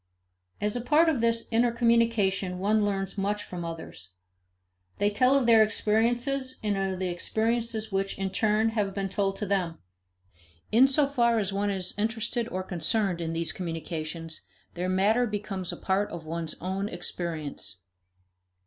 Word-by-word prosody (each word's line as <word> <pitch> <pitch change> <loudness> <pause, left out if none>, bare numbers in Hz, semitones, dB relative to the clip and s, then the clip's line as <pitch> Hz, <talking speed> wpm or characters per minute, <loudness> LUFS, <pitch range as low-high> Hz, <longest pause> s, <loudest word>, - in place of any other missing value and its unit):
As 210 +1 -1
a 245 - -1
part 300 +7 +4
of 275 -7 0
this 230 0 +1
intercommunication 230 -5 +2
one 210 +3 +2
learns 195 -1 -1
much 205 +1 -1
from 175 -1 -6
others. 160 - -8 0.8
They 205 +1 +2
tell 255 +6 +4
of 275 -3 +3
their 230 -2 +7
experiences 240 +5 +1
and 210 -1 +1
of 195 -1 -1
the 185 0 -2
experiences 220 +4 -1
which, 195 0 -1
in 195 -1 -2
turn, 215 +2 +2
have 210 -3 -1
been 195 -1 -2
told 195 0 0
them. 190 -5 -1 0.9
In 245 +5 +7
so 280 +2 +3
far 240 -4 +2
as 200 -2 -1
one 200 +1 0
is 190 -2 -1
interested 225 +2 -1
or 185 -3 -3
concerned 185 0 0
in 165 0 -2
these 165 -1 0
communications, 165 - -4 0.3
their 180 +1 -2
matter 210 +6 +3
becomes 200 -4 -3
a - - -7
part 195 +2 0
of 165 -2 -7
one's 165 0 -4
own 190 +3 -2
experience. 165 - -4
200 Hz, 155 wpm, -28 LUFS, 185-230 Hz, 0.9 s, their